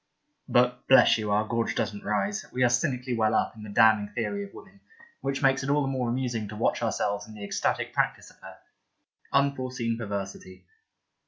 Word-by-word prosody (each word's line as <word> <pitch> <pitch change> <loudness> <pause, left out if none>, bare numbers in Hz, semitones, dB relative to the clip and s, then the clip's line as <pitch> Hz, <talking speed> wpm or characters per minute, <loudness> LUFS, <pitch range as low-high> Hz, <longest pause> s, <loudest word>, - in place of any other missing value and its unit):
(But, 125 0 +2
bless 130 -3 +6
you! 105 -1 -3
our 105 +1 +1
gorge 115 0 -1
doesn't 105 -1 -2
rise. 195 - -1
We 130 - 0
are 120 - +5
cynically 125 -2 0
well 110 -1 +2
up - - 0
in 110 - -12
the 105 - -9
damning 110 -1 +4
Theory 200 0 -2
of 200 - -10
woman, 195 0 -15 0.4
which 135 +1 -2
makes 135 0 +3
it 135 - -4
all 145 +1 +3
the - - -2
more 130 -3 -1
amusing 120 -3 -2
to 105 - -8
watch 115 - 0
ourselves 105 -2 -1
in 110 - -12
the 105 - -9
ecstatic 100 - -1
practice - - -1
of - - -23
her. - - -12 0.7
Unforeseen 130 -4 0
perversity.) 100 -3 -6
120 Hz, 190 wpm, -27 LUFS, 105-135 Hz, 0.7 s, bless